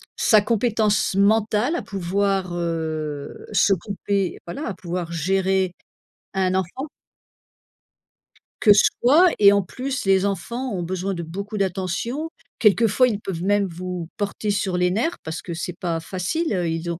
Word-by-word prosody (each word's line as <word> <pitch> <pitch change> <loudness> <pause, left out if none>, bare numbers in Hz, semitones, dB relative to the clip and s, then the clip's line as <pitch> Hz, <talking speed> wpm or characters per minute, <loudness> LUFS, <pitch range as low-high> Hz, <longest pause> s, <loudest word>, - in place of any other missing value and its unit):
sa 215 -2 +5
compétence 215 -1 +1
mentale 215 - +2
à - - -3
pouvoir, 195 0 -1
heu, 155 -4 -3
s'occuper 200 0 0
voilà, 255 - -5
à - - -3
pouvoir 175 -1 -5
gérer 190 +2 +1 0.6
un 185 -1 +1
enfant. 190 - -2 1.7
Que 220 - +3
soi 300 - +5
et 200 -1 +8
en 200 - +2
plus, 260 +8 -4
les 195 -1 +4
enfants 235 +6 -2
ont 180 -4 -2
besoin 185 +2 -2
de 170 - -4
beaucoup 200 +6 -6
d'attention. 195 - -2 0.3
Quelquefois 225 +3 +4
ils 215 -5 -1
peuvent 190 -5 -5
même 205 +1 +2
vous 180 0 -5
porter 205 +1 -2
sur 195 -2 -1
les 180 0 +2
nerfs 235 - 0
parce 160 0 -5
que 170 - -6
c'est 175 +2 -4
pas 170 -3 -2
facile, 190 - -2
heu, 175 -3 0
ils 165 +1 -2
ont 170 - -5
195 Hz, 150 wpm, -23 LUFS, 175-215 Hz, 1.7 s, et